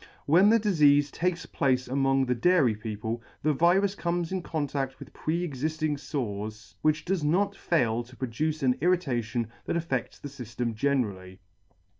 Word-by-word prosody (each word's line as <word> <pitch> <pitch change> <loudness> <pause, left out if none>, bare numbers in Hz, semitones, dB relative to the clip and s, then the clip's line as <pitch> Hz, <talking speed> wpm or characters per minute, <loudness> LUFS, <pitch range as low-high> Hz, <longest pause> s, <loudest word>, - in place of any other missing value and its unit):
When 180 +7 +5
the 230 +1 +5
difeafe 145 -8 +4
takes 180 +1 -1
place 130 -2 0
among 135 +1 +2
the 125 - +1
Dairy 140 -1 +3
people, 110 +2 -4 0.2
the 155 +1 +3
virus 180 +6 +3
comes 175 -3 -2
in 190 -1 -1
contaft 145 -5 -3
with - - -12
pre 170 +3 -2
exifting 155 +2 -2
fores, 110 - -5
which 155 +3 +1
does 185 -3 0
not 195 +7 +1
fail 120 -12 +1
to 125 +1 -16
produce 150 +5 -2
an 125 -1 +3
irritation 125 -10 0 0.2
that - - -2
affe&s 160 -7 -2
the - - -8
fyftem 120 -3 -4
generally. 105 -7 -1
140 Hz, 155 wpm, -28 LUFS, 120-170 Hz, 0.2 s, When